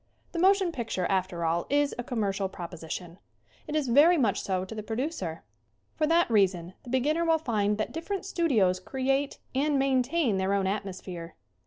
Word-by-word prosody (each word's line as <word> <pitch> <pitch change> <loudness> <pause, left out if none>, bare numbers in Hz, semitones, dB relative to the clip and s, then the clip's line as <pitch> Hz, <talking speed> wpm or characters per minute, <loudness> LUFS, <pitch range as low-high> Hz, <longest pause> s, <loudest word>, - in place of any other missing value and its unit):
The 340 - -3
motion 380 0 +4
picture, 225 - -2
after 185 -3 0
all, 165 +1 0
is 290 0 +2
a - - -1
commercial 200 -5 -1
proposition. 170 0 -7 0.5
It 300 - -3
is 300 -3 +1
very 295 +8 +6
much 230 -9 +1
so 185 -1 -1
to 190 - -8
the 215 - -5
pro 220 +1 -5
ducer. 290 +8 -3 0.5
For 310 - +1
that 335 +2 +4
reason 185 -5 +2
the - - -12
beginner 290 +7 +1
will 325 -1 +3
find 210 -8 0
that 215 - -2
different 370 +5 -4
studios 230 - +2
create 270 +6 -1 0.2
and 285 +2 +1
maintain 265 - +2
their 190 +1 +1
own 195 -1 +1
atmosphere. 185 -4 -4
235 Hz, 175 wpm, -28 LUFS, 190-300 Hz, 0.5 s, very